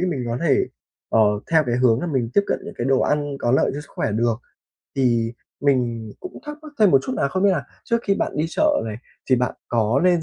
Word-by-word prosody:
mình 165 Hz, -9 st, -1 dB
có 120 Hz, +1 st, -2 dB
thể, 140 Hz, -, +3 dB, 0.4 s
ờ, 115 Hz, -, +3 dB, 0.3 s
theo 160 Hz, -1 st, +5 dB
cái 120 Hz, 0 st, +1 dB
hướng 125 Hz, -2 st, +3 dB
là 175 Hz, -, -2 dB
mình 130 Hz, -7 st, 0 dB
tiếp -, -, +6 dB
cận -, -, 0 dB
những 210 Hz, 0 st, -8 dB
cái -, -, -1 dB
đồ 135 Hz, -1 st, +3 dB
ăn 145 Hz, -1 st, 0 dB
có 120 Hz, -, 0 dB
lợi 130 Hz, -, +3 dB
cho 145 Hz, -, -4 dB
sức 150 Hz, -, -14 dB
khỏe 105 Hz, -, -1 dB
được. 115 Hz, +1 st, +1 dB, 0.6 s
Thì 120 Hz, -3 st, +2 dB, 0.3 s
mình 120 Hz, -6 st, 0 dB
cũng 370 Hz, -, -8 dB
thắc 295 Hz, 0 st, -6 dB
mắc 305 Hz, -, -11 dB
thêm 210 Hz, -3 st, +6 dB
một 135 Hz, -, +6 dB
chút 260 Hz, -, -4 dB
nà, 140 Hz, -, +1 dB
không 185 Hz, +6 st, -1 dB
biết 200 Hz, -, +5 dB
là 170 Hz, -7 st, 0 dB, 0.2 s
trước 235 Hz, -, +1 dB
khi 200 Hz, -, +1 dB
bạn -, -, -2 dB
đi 150 Hz, -, +1 dB
chợ 305 Hz, -, +2 dB
này 110 Hz, -2 st, -4 dB, 0.3 s
thì 130 Hz, -, +6 dB
bạn 125 Hz, 0 st, 0 dB
có 115 Hz, +2 st, +2 dB
lên 175 Hz, -2 st, +4 dB
135 Hz, 250 wpm, -22 LUFS, 120-180 Hz, 0.6 s, tiếp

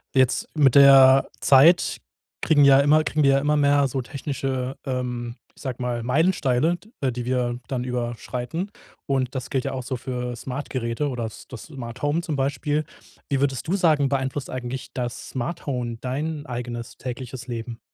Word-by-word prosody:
Jetzt 130 Hz, -1 st, +2 dB
mit 140 Hz, -5 st, +4 dB
der 135 Hz, -1 st, +8 dB
Zeit 150 Hz, +6 st, +5 dB, 0.5 s
kriegen 150 Hz, -2 st, +4 dB
ja 135 Hz, 0 st, +7 dB
immer 150 Hz, +2 st, +4 dB
kriegen 155 Hz, 0 st, 0 dB
wir 135 Hz, -, +5 dB
ja 135 Hz, -, +4 dB
immer 150 Hz, +2 st, +1 dB
mehr 145 Hz, -1 st, +4 dB
so 135 Hz, +1 st, -3 dB
technische, 135 Hz, -1 st, -4 dB
ähm 125 Hz, -2 st, -3 dB, 0.2 s
ich -, -, -17 dB
sage 130 Hz, -3 st, -5 dB
mal, 120 Hz, -1 st, -2 dB
Meilensteine, 150 Hz, +2 st, +2 dB
d 210 Hz, -, -21 dB
äh, 135 Hz, -2 st, +1 dB
die 120 Hz, 0 st, -5 dB
wir 125 Hz, -1 st, -1 dB
dann 125 Hz, -2 st, -2 dB
überschreiten. 125 Hz, -, -4 dB, 0.3 s
Und 135 Hz, -1 st, -1 dB
das 130 Hz, 0 st, -5 dB
gilt 130 Hz, -2 st, -1 dB
ja -, -, -2 dB
auch 130 Hz, -, -4 dB
so 125 Hz, +1 st, -3 dB
für 125 Hz, 0 st, -4 dB
Smartgeräte 125 Hz, +1 st, -3 dB
oder 120 Hz, -3 st, -3 dB
das 110 Hz, -, -9 dB
das 125 Hz, -, -9 dB
Smarthome 145 Hz, +3 st, -3 dB
zum 165 Hz, -3 st, -3 dB
Beispiel. 145 Hz, +3 st, -1 dB, 0.4 s
Wie 140 Hz, -, +1 dB
würdest 135 Hz, 0 st, -1 dB
du 180 Hz, -, +1 dB
sagen, 155 Hz, -7 st, +3 dB
beeinflusst 135 Hz, 0 st, -2 dB
eigentlich 130 Hz, 0 st, -5 dB
das 120 Hz, -2 st, -4 dB
Smarthome 125 Hz, -3 st, -3 dB
dein 145 Hz, +4 st, -3 dB
eigenes 120 Hz, -1 st, -6 dB
tägliches 125 Hz, 0 st, -6 dB
Leben? 115 Hz, -1 st, -6 dB
130 Hz, 170 wpm, -24 LUFS, 125-145 Hz, 0.5 s, der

